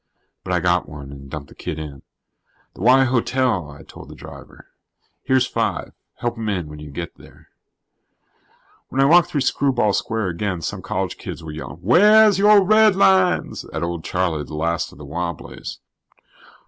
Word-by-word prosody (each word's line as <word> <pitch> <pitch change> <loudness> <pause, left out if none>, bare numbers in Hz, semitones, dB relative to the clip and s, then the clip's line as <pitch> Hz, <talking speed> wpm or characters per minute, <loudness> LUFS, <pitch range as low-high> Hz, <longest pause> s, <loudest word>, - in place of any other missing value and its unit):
But 95 - -5
I 90 - +2
got 90 +1 +1
one 70 -2 -9
and 70 -1 -11
dumped 70 -1 -7
the - - -14
kid 80 - -6
in. 75 -3 -8 0.7
"The - - -12
Y 130 +5 +6
Hotel," 125 - 0
I 70 +2 -12
told - - -13
the - - -11
driver. - - -13 0.6
"Here's 130 -1 +2
five. - - -2 0.2
Help 120 -1 -3
him 110 -1 -3
in 90 -7 -2
when 75 0 -10
you 75 0 -9
get 85 +4 -6
there." - - -18 1.4
When 135 - -3
I 135 - +5
walked 170 +4 +5
through 145 - -1
Screwball 130 -5 +1
Square 110 -3 -1
again, 90 0 -3
some - - -4
college - - -3
kids - - -7
were 80 - -7
yelling 70 0 -8
"wheah's 210 - +6
your 205 0 +6
redlines" 190 -3 +3
at - - -3
old 85 -1 -3
Charlie, 90 -5 -1
the 75 - -9
last 85 +2 -1
of - - -16
the 75 - -10
Wobblies. 85 +2 -6
95 Hz, 175 wpm, -21 LUFS, -, 1.4 s, Y